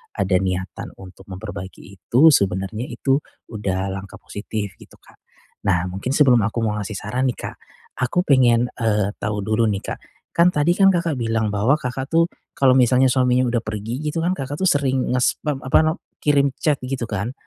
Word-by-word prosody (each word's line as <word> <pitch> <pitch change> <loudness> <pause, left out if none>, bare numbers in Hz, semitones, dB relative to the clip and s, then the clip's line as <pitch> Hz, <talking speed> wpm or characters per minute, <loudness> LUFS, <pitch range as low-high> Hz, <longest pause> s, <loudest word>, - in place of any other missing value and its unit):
ada 95 -1 +1
niatan 95 -1 -4
untuk 95 0 -13
memperbaiki 95 0 -7 0.2
itu 155 +7 +5
sebenarnya 100 +1 0
itu 135 +3 +1 0.3
udah 95 -3 -2
langkah 95 0 -7
positif, 100 -1 -5
gitu - - -16
Kak. - - -22 0.5
Nah 90 -3 +2
mungkin 110 +9 -3
sebelum 130 -5 +5
aku 115 +2 -2
mau 105 -1 -1
ngasih 105 +1 -5
saran 125 +7 -1
nih 125 - -1
Kak, - - -6 0.4
aku 130 +8 +1
pengen, 125 -5 +3
eee, 105 -3 +1
tahu 105 -1 -2
dulu 110 +2 +1
nih 100 -2 -2
Kak, - - -5 0.3
kan 170 +1 +4
tadi 150 +4 +3
kan 195 -1 +6
Kakak 170 -6 -1
bilang 115 -2 0
bahwa 105 +7 +2
Kakak 135 -2 -4
tuh, 165 +1 +4 0.3
kalau 135 -2 +4
misalnya 125 +1 +4
suaminya 125 -1 +3
udah 120 - +1
pergi 110 +4 -4
gitu 165 +2 -2
kan, 180 - +1
Kakak 145 +3 -5
tuh 190 - +4
sering 135 -2 0
ngespam, 135 +3 0
apa 130 - +3
nam 155 +1 +1 0.3
kirim 140 -1 +3
chat 150 -4 0
gitu 130 -1 -3
kan. 105 +3 -2
120 Hz, 180 wpm, -21 LUFS, 100-135 Hz, 0.5 s, kan